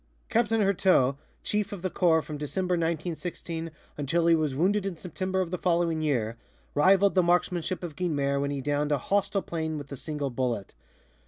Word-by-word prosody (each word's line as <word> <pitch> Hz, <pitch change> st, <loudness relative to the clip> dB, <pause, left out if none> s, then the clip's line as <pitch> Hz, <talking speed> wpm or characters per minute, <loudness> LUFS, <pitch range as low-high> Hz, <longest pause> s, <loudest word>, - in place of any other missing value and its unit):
Captain 225 Hz, -1 st, +2 dB
Heurteaux, 185 Hz, -9 st, +3 dB, 0.3 s
chief 210 Hz, 0 st, -1 dB
of 195 Hz, -3 st, -7 dB
the 185 Hz, -, 0 dB
corps 160 Hz, -3 st, +3 dB
from 150 Hz, -, -6 dB
December, 180 Hz, +5 st, -1 dB
1916, 165 Hz, 0 st, -3 dB, 0.3 s
until 165 Hz, +4 st, +1 dB
he 170 Hz, -, +6 dB
was 155 Hz, -4 st, +1 dB
wounded 195 Hz, +7 st, +2 dB
in 195 Hz, -3 st, -4 dB
September 185 Hz, +2 st, -2 dB
of 175 Hz, -2 st, -3 dB
the 180 Hz, -, -2 dB
following 170 Hz, -2 st, +1 dB
year, 120 Hz, -7 st, 0 dB, 0.4 s
rivaled 190 Hz, +6 st, +5 dB
the 185 Hz, -, +5 dB
marksmanship 175 Hz, 0 st, +1 dB
of 165 Hz, -4 st, -5 dB
Guynemer 140 Hz, -6 st, 0 dB
when 140 Hz, -, -1 dB
he 140 Hz, -1 st, -2 dB
downed 145 Hz, +2 st, 0 dB
a 145 Hz, -, +3 dB
hostile 200 Hz, +7 st, 0 dB
plane 160 Hz, -2 st, -3 dB
with 145 Hz, -1 st, -8 dB
a -, -, -4 dB
single 145 Hz, -1 st, -3 dB
bullet. 120 Hz, -5 st, -2 dB
165 Hz, 180 wpm, -28 LUFS, 145-185 Hz, 0.4 s, he